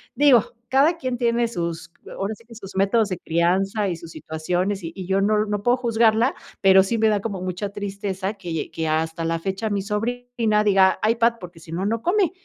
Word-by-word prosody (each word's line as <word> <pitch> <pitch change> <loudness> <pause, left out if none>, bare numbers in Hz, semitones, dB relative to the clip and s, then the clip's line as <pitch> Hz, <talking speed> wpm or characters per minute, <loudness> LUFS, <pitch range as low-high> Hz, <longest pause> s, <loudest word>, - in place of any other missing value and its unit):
digo, 275 -6 +5 0.2
cada 280 +7 +4
quien 255 -6 -3
tiene 235 0 +1
sus 170 -5 -4 0.2
ahora 195 +3 -2
sí 230 - -16
que 230 -1 -14
sus 195 -3 -9
métodos 200 +2 +2
de 185 - -3
crianza 190 +5 0
y 175 - -3
sus 165 0 -11
situaciones, 180 +6 -2
y 165 0 -6
y 190 -2 -6
yo 195 +1 +2
no 210 +1 +2
no 205 -1 -2
puedo 245 +2 +4
juzgarla, 230 0 +2 0.3
pero 190 0 +7
sí 230 +4 -1
me 220 0 +3
da 210 - +2
como 200 -3 -4
mucha 185 +2 -3
tristeza 200 0 -4
que 170 -5 -5
que 160 -1 -3
hasta 160 +1 -1
la 165 0 0
fecha 195 +5 -3
mi 200 -1 -1
sobrina 225 +1 -1
diga: 195 -2 +4
"iPad", 230 +1 +3
porque, 175 -2 -10
si 160 0 -11
no, 180 +3 -2
no 225 +2 -1
come, 360 - +2
200 Hz, 205 wpm, -23 LUFS, 185-230 Hz, 0.3 s, pero